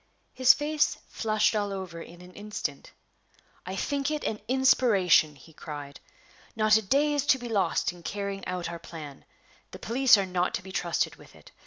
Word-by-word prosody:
His 255 0 +6
face 295 +1 0
flushed 215 -1 +1
all 205 -1 -1
over 185 -4 -6
in 170 +1 -12
an 180 0 -14
instant. 205 -9 -6 0.8
"I 185 - -4
think 280 +6 -1
it 305 -1 -3
an 215 - -2
inspiration!" 210 - +4
he 150 +4 -17
cried. 145 -2 -8 0.6
"Not 215 -1 +4
a 220 - +4
day 280 +8 +2
is 290 -2 +1
to 270 - +5
be 245 -1 -7
lost 195 -8 0
in 175 - -14
carrying 200 +2 -4
out 180 -1 -3
our 170 0 -6
plan. 155 -4 -10 0.4
The - - -10
police 245 0 +4
are 200 - 0
not 180 -1 -1
to - - -5
be 190 - -10
trusted 175 -2 -1
with - - -17
it. - - -17
200 Hz, 185 wpm, -27 LUFS, 175-245 Hz, 0.8 s, His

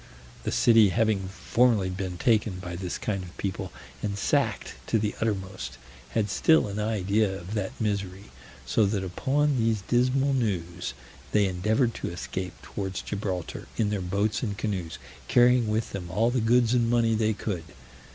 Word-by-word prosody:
The - - 0
city 115 -3 +6
having 100 0 +1
formerly 105 0 +2
been 90 -1 -4
taken 110 -3 +2
by 90 -1 -6
this 90 0 -4
kind 100 -3 -2
of 90 -1 -11
people, 95 -2 -3 0.3
and 100 -1 -2
sacked - - 0
to - - +2
the 105 -1 -1
uttermost, 95 - -3 0.4
had 105 -2 +1
still 160 -8 +4
an 100 +1 -4
idea 105 -1 +1
of 90 +4 -8
that 105 -3 -3
misery; 100 -2 -3 0.3
so 110 - +3
that 100 -1 -1
upon 140 +9 +1
these 110 -3 +1
dismal 130 +3 +2
news 90 -8 -2 0.4
they 105 -1 +4
endeavored 110 +7 +1
to - - -4
escape 90 +1 -5
towards 95 -2 -4
Gibraltar 95 -4 -4
in 105 -2 +1
their 105 -2 -1
boats 100 +4 0
and 105 -5 -3
canoes, 90 -7 -3 0.3
carrying 125 -1 +5
with 110 +1 -1
them 90 -3 -5
all 110 +7 +2
the 125 -1 +1
goods 120 +1 +3
and 120 -2 +2
money 115 -1 +3
they 110 0 +2
could. 90 -7 -4
105 Hz, 165 wpm, -27 LUFS, 95-115 Hz, 0.4 s, city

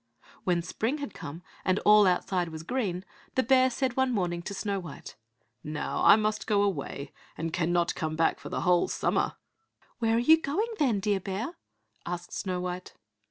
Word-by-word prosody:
When 175 -3 +2
spring 225 - -2
had 285 -2 -6
come 160 +5 -8 0.2
and 185 +1 +2
all 210 -1 +7
outside 180 -1 +1
was 160 0 -7
green, 190 -4 -2 0.3
the 260 - +3
bear 260 +1 +5
said 255 0 -1
one 260 -1 +2
morning 175 -6 -1
to 200 - -6
Snow 200 0 -2
white, 165 -6 -9 0.5
"Now 150 0 -3
I - - +9
must 215 0 -1
go 205 -2 +3
away, 145 -7 -3 0.3
and 165 0 -3
cannot 175 0 +1
come 155 -2 -3
back 165 0 +2
for - - -8
the - - -2
whole 180 -1 +3
summer." - - 0 0.6
"Where 225 -1 +2
are - - +3
you 315 +7 +6
going, 420 +12 -1
then, 240 -9 +2
dear 200 -1 +1
bear?" 200 - -4 0.5
asked 175 0 -5
Snow 185 -2 -2
white. 180 0 -5
195 Hz, 180 wpm, -28 LUFS, 175-235 Hz, 0.6 s, I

